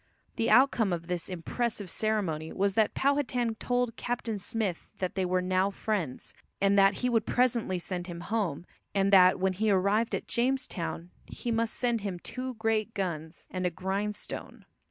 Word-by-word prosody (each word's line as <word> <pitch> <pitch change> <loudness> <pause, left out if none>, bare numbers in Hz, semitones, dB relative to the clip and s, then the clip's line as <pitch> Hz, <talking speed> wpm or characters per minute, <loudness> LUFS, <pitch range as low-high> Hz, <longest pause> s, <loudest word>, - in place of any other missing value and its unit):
The 230 - 0
outcome 245 -6 +5
of 170 -1 -2
this 175 -1 -3
impressive 205 +4 -2
ceremony 185 -8 -1
was 200 0 +1
that 220 +1 +2
Powhatan 255 -4 +1
told 245 -2 0
Captain 235 -3 -2
Smith 200 -3 -3
that 185 -1 -2
they 190 -1 0
were 180 0 +1
now 185 +1 +2
friends, 195 -9 -3 0.3
and 195 0 +3
that 195 0 +5
he - - +4
would 225 -3 +1
presently 235 -6 +2
send 175 0 -4
him 170 -1 -6
home, 185 -6 -2 0.3
and 195 0 +2
that 185 -1 +7
when 190 0 +2
he 215 +4 0
arrived 205 +4 +2
at - - -5
Jamestown 235 -9 -1 0.2
he 240 - -4
must 225 0 0
send 240 -3 0
him 195 -3 -3
two 255 +7 -5
great 225 0 0
guns 170 -4 -4
and 185 0 -3
a - - +1
grindstone. 195 +4 -4
200 Hz, 170 wpm, -29 LUFS, 185-230 Hz, 0.3 s, that